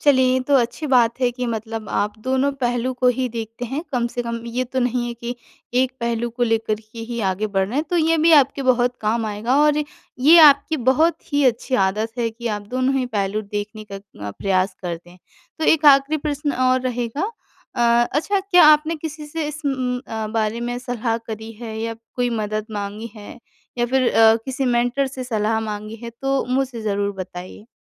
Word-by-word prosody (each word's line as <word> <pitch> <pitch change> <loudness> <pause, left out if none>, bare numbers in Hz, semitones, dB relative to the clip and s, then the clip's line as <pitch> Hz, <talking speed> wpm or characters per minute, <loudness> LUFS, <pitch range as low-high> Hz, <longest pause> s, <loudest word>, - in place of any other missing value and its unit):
चलिए 260 -3 +4
ये 260 - +2
तो 285 - +4
अच्छी 250 +5 -1
बात 245 -2 +3
है 245 -1 +3
कि 250 0 -4
मतलब 225 -1 -4
आप 205 +1 0
दोनों 265 +2 +1
पहलू 245 +1 0
को 250 0 +2
ही 255 -1 0
देखते 230 +1 -6
हैं, 270 +6 -4
कम 240 -2 +1
से 245 +1 -4
कम 235 0 -3
ये 245 +2 -2
तो 260 +2 -4
नहीं 245 0 0
है 240 - -4
कि 235 +1 -5 0.5
एक 260 -1 -1
पहलू 235 0 -1
को 245 +1 -4
लेकर 225 -2 +1 0.2
के 230 - -10
ही 235 -1 -3
आगे 205 +4 -2
बढ़ 195 -2 0
रहे 250 - -4
हैं। 305 - +1
तो 350 - +1
ये 325 0 +3
भी 330 +2 +4
आपके 275 -2 +4
बहुत 245 0 +2
काम 220 +1 0
आएगा 220 +5 -1
और 300 0 +4 0.4
ये 315 +6 +8
आपकी 295 +1 +6
बहुत 320 +5 +2
ही 285 0 +3
अच्छी 255 +1 +1
आदत 215 +4 -1
है 230 -1 +1
कि 235 +1 -8
आप 205 - -5
दोनों 255 +1 0
ही 255 - +1
पहलू 200 +2 -1
देखने 210 +1 -6
का - - -4 0.3
अ, - - -4
प्रयास 190 - 0
करते 175 -1 -6
हैं। 180 - -17 0.4
तो 315 - -1
एक 315 -1 +3
आखिरी 275 +2 +6
प्रश्न 290 -1 -2 0.2
और 255 0 +2
रहेगा 250 - -2 0.4
अ, 240 - 0 0.3
अच्छा 385 +7 +1
क्या 370 -4 +5
आपने 305 +2 +5
किसी 310 -1 -7
से 310 0 -3
इस 300 +1 -7
उम 255 -2 -1
उ - - -10 0.3
बारे 225 +1 -1
में 245 +1 -3
सलाह 245 -2 -2
करी 220 0 -7
है 220 -2 -6
या 230 0 -3 0.2
कोई 245 -1 0
मदद 215 0 -3
माँगी 205 +2 -5
है? 210 +3 -10 0.4
या 240 - +2
फिर 260 +1 +1
अ, 225 0 +6
किसी 265 0 -3
मेंटर 245 +2 +1
से 260 -1 -6
सलाह 220 -2 0
माँगी 215 0 -5
है 235 - -5
तो 270 0 +1
मुझे 265 -4 -2
ज़रूर 200 -1 -1
बताइए? 185 +3 -8
245 Hz, 210 wpm, -21 LUFS, 220-270 Hz, 0.5 s, ये